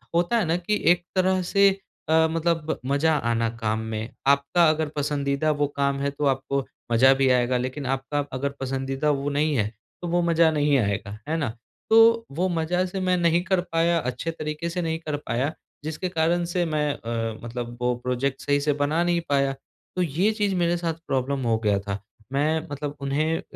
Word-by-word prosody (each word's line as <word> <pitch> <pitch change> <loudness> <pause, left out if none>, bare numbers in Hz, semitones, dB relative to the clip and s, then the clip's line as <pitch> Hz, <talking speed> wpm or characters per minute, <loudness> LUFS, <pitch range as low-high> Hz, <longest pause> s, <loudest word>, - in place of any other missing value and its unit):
होता 175 +8 +2
है 215 - +1
ना, 165 +1 +1
कि 205 +4 -1
एक 175 0 +2
तरह 185 0 +2
से 200 0 +6 0.4
अ, 160 0 +5
मतलब 165 -1 -1
मज़ा 140 +4 +2 0.2
आना 115 0 +1
काम 110 -1 -1
में, 110 +1 -4 0.2
आपका 140 +4 +4
अगर 155 0 0
पसंदीदा 145 0 0
वो 145 -1 +1
काम 140 0 0
है 140 - +1
तो 145 +1 -3
आपको 135 0 0 0.3
मज़ा 130 +3 +6
भी 135 0 +2
आएगा 125 0 +3
लेकिन 130 +3 -4
आपका 135 +2 -1
अगर 140 +2 -1
पसंदीदा 135 +2 -1
वो 140 0 -1
नहीं 145 +1 +1
है, 105 -4 +1 0.3
तो 175 - -4
वो 175 +1 +1
मज़ा 170 -1 +4
नहीं 145 -2 +2
आएगा, 100 -2 -1
है 160 - +1
ना? 140 -7 -1 0.4
तो 230 +1 +6
वो 175 +6 0
मज़ा 175 +2 0
से 190 +1 -4
मैं 185 -1 +2
नहीं 170 0 +3
कर 190 -1 +1
पाया 170 0 +1
अच्छे 130 +4 -3
तरीके 155 +1 -4
से 180 +1 -2
नहीं 160 -1 -2
कर 155 -3 -3
पाया, 130 +6 0 0.3
जिसके 160 +4 -3
कारण 170 +1 +1
से 175 0 0
मैं 150 -2 0
अ, 115 -1 -4
मतलब 120 0 -5
वो 125 0 +1
प्रोज़ेक्ट 130 +2 -1
सही 145 0 +1
से 150 0 +2
बना 155 +4 +1
नहीं 175 -1 +1
पाया, 140 -1 +2 0.4
तो 185 - 0
ये 180 +6 +1
चीज़ 205 -3 0
मेरे 175 0 +1
साथ 170 -1 -1
प्रॉब्लम 135 +1 -1
हो 115 -1 +3
गया 105 -3 +1
था। 100 0 -5 0.3
मैं 155 +3 +2
मतलब 145 0 -4
उन्हें 155 +4 0
अ, - - -5
150 Hz, 200 wpm, -25 LUFS, 135-170 Hz, 0.4 s, से